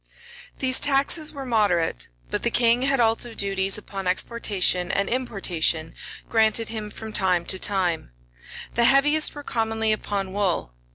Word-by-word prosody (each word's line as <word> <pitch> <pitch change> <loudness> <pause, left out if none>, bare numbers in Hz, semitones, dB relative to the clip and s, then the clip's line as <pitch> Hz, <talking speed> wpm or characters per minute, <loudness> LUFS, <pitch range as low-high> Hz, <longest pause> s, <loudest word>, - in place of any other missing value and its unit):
These 260 -1 +4
taxes 290 +2 +2
were 275 -3 -7
moderate; 190 - +1 0.2
but - - -1
the - - +1
king 235 0 +3
had 270 0 +1
also 230 0 0
duties 195 0 +1
upon 195 -2 -6
exportation 185 -2 0
and 200 0 0
importation 180 -10 -1 0.3
granted 220 0 +2
him 215 -2 -5
from 220 +1 -8
time 180 -4 +1
to 190 - +1
time: 180 - 0 0.6
the 235 - +2
heaviest 295 +5 +3
were 290 - -8
commonly 225 -3 -1
upon 200 -3 -2
wool. 190 - -1
215 Hz, 145 wpm, -23 LUFS, 190-240 Hz, 0.6 s, These